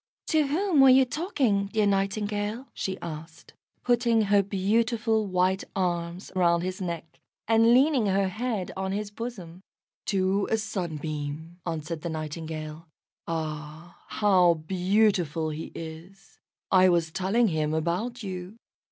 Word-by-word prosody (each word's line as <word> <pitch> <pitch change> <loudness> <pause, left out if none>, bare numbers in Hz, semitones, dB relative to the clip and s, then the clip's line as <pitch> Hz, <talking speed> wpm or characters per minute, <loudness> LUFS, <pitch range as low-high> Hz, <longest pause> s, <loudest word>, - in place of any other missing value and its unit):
"To 310 -3 +3
whom 330 +1 +2
were 270 - +8
you 260 +1 +7
talking, 250 - 0
dear 215 +1 +1
Nightingale?" 205 +4 -1
she 190 0 -4
asked, 160 0 -9 0.3
putting 235 -2 +3
her 205 0 +4
beautiful 220 +3 +1
white 185 +1 +1
arms 175 -1 -2
round 170 -2 +3
his 185 +1 -4
neck, 170 -3 -5 0.3
and 225 +1 +5
leaning 260 -2 +4
her 195 0 +2
head 215 -1 -3
on 190 0 -2
his 205 0 -3
bosom. 195 -7 -7 0.5
"To 195 0 +1
a 220 - +2
Sunbeam," 160 -5 -4
answered 160 -1 -4
the 170 - -4
Nightingale. 155 0 -6 0.4
"Ah, 155 +1 -5
how 185 -5 +4
beautiful 180 -2 +1
he 155 +2 -6
is! 165 +4 -10 0.3
I 185 -1 +6
was 170 -2 +1
telling 200 +6 +2
him 155 -2 0
about 185 +10 -2
you. 185 +2 -6
190 Hz, 130 wpm, -27 LUFS, 165-220 Hz, 0.5 s, were